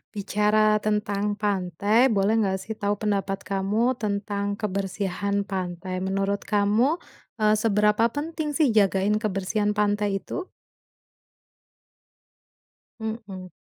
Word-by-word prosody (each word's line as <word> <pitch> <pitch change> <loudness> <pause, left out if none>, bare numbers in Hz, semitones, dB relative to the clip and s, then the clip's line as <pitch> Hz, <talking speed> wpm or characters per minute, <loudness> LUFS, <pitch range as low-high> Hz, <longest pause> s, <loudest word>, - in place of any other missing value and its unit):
Bicara 210 +1 +2
tentang 210 -1 -1
pantai 205 +4 +2
boleh 205 0 +2
nggak 190 -2 +1
sih 220 +4 -6
tahu 205 -1 -1
pendapat 195 -2 -2
kamu 200 +6 +1
tentang 200 -3 -2
kebersihan 200 0 -2
pantai 185 -1 -4
menurut 195 +1 -1
kamu, 215 +9 +2 0.4
eee, 215 -1 +3
seberapa 210 +1 +3
penting 310 +3 -3
sih 290 -8 +3
jagain 205 0 +2
kebersihan 205 0 -1
pantai 205 -1 +1
itu? 365 - -6 2.5
Mhm. 220 -5 -6
205 Hz, 100 wpm, -25 LUFS, 195-215 Hz, 2.5 s, eee